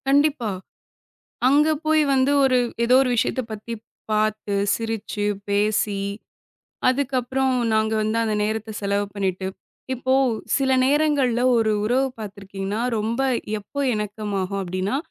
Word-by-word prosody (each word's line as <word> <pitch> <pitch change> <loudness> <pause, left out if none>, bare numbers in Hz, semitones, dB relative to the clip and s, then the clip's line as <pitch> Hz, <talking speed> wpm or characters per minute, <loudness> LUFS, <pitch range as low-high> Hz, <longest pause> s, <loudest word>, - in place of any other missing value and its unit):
கண்டிப்பா. 280 -4 +3 1.0
அங்க 295 +3 +4 0.2
போய் 310 0 +4
வந்து 265 +1 +3
ஒரு 255 -1 +4 0.3
ஏதோ 245 +2 +4
ஒரு 265 - 0
விஷயத்த 255 +2 +1
பத்திப் 220 +1 -7 0.3
பாத்து, 215 -1 0 0.2
சிரிச்சு, 225 -2 -3 0.2
பேசி 205 0 +1 0.9
அதுக்கப்புறம் 260 0 0 0.2
நாங்க 220 0 +2
வந்து 215 +1 0
அந்த 215 -1 0
நேரத்த 220 +1 -2
செலவு 200 0 0
பண்ணிட்டு, 190 -2 -2 0.5
இப்போ 260 +1 -1 0.4
சில 270 -1 +1
நேரங்கள்ல 280 -4 +2 0.2
ஒரு 225 -1 +2
உறவு 255 +5 +2
பார்த்துருக்கீங்கன்னா, 200 0 -5 0.2
ரொம்ப 225 +4 -1 0.4
எப்போ 245 +7 -6
இணக்கமாகும் 205 -2 -3
அப்பிடின்னா, 185 +5 -2
220 Hz, 115 wpm, -23 LUFS, 205-260 Hz, 1.0 s, அங்க